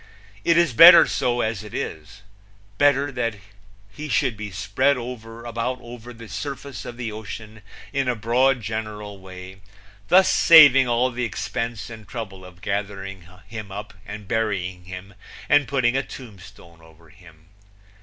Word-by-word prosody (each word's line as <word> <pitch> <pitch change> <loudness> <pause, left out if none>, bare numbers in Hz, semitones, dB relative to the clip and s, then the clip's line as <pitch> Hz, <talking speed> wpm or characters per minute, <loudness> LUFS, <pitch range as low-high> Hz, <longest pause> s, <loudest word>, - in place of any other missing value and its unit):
It 170 0 +3
is 170 -6 +3
better 165 +9 +10
so, 120 0 -1
as 110 -2 -2
it 105 - -10
is 80 +7 -6 0.6
better 145 0 +3
that 115 -4 -2 0.6
he 150 +9 -8
should 125 -3 +1
be 105 0 -6
spread 115 +8 0
about 115 0 -5
over 120 0 -11
the 115 -1 -12
surface 140 -3 -6
of 120 - -8
the 120 -3 -4
ocean 110 0 -9 0.3
in 135 -2 0
a 125 - +1
broad 125 +4 +2
general 105 -2 -5
way, 95 0 -11 0.5
thus 190 +1 +6
saving 140 -6 +7
all 120 +2 +1
the 125 +1 -4
expense 115 +3 -4
and 110 -2 -11
trouble 100 -6 -7
of 90 0 -14
gathering 100 -3 -5 0.2
him 105 -2 -8
up 105 +2 -7
and 105 -1 -9
burying 95 -5 -2
him 95 +2 -9 0.3
and 145 -1 +4
putting 130 -3 +1
a 135 - +2
tombstone 100 -9 -13
over 80 0 -19
him. 85 -3 -19
110 Hz, 150 wpm, -23 LUFS, 100-125 Hz, 0.6 s, better